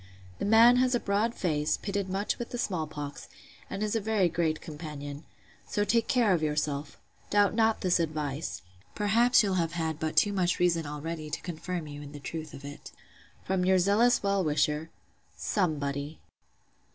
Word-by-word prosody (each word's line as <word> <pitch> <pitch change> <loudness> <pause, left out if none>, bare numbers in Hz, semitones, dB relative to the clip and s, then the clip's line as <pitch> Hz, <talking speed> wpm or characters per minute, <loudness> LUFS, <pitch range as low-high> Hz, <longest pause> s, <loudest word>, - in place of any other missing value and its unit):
The - - -1
man 230 +4 +7
has 255 0 +3
a - - +2
broad 210 +3 0
face, 155 -4 0
pitted 200 -2 -3
much 195 +2 -1
with 240 - -4
the 245 - -5
small 180 -9 -1
pox, 145 -2 -7 0.4
and 200 +1 -3
is 215 +1 -1
a 225 - +1
very 205 -4 +2
great 160 -2 0
companion. 150 -2 -8 0.4
So 205 - 0
take 230 +3 +2
care 235 -6 +3
of 170 - +1
yourself. 150 -1 -2 0.3
Doubt 205 -1 +3
not 220 0 +2
this 180 -2 +2
advice. 155 - -3 0.3
Perhaps 230 +4 +4
you'll 190 -3 +1
have 165 0 -2
had 160 -2 -2
but 155 -1 -3
too 205 +5 +4
much 180 -2 +1
reason 165 -3 +1
already 155 +1 -5
to 150 - -4
confirm 175 0 -4
you 145 -1 -8
in 145 0 -10
the 145 - -8
truth 155 +2 -6
of 140 - -10
it. 145 +1 -9 0.5
From 190 -1 0
your 190 +1 +4
zealous 205 +7 +3
well 200 -1 +2
wisher, 150 +1 0 0.5
'SOMEBODY. 145 -5 -1
175 Hz, 175 wpm, -29 LUFS, 150-205 Hz, 0.5 s, man